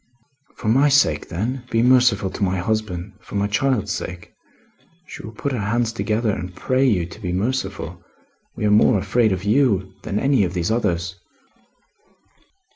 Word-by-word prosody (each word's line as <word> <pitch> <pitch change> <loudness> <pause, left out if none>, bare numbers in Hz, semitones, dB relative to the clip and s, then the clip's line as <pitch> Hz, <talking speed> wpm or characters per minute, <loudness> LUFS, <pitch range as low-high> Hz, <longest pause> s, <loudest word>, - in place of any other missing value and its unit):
"For 115 - -6
my 135 +7 +4
sake, 140 0 +2
then, 120 +9 -3
be 115 0 +2
merciful 125 -6 +4
to - - -4
my 95 0 +1
husband. 100 -1 -2
For - - -10
my 100 0 +1
child's 105 -1 0
sake! 90 -2 -6 0.7
She - - -9
will 110 - -8
put 140 +6 -4
her 125 - -2
hands 115 +3 0
together 110 -1 0
and 90 -2 -5
pray 130 0 +1
you 95 -8 +2
to 85 - -11
be 90 - -3
merciful. 110 +9 -3 0.5
We - - -2
are 105 - +3
more 105 +2 +5
afraid 110 +3 +2
of 95 0 -2
you 105 -4 +2
than 100 - -3 0.3
of 90 -1 -2
these 90 +4 0
others." 90 -6 -1
105 Hz, 165 wpm, -21 LUFS, 95-120 Hz, 0.7 s, more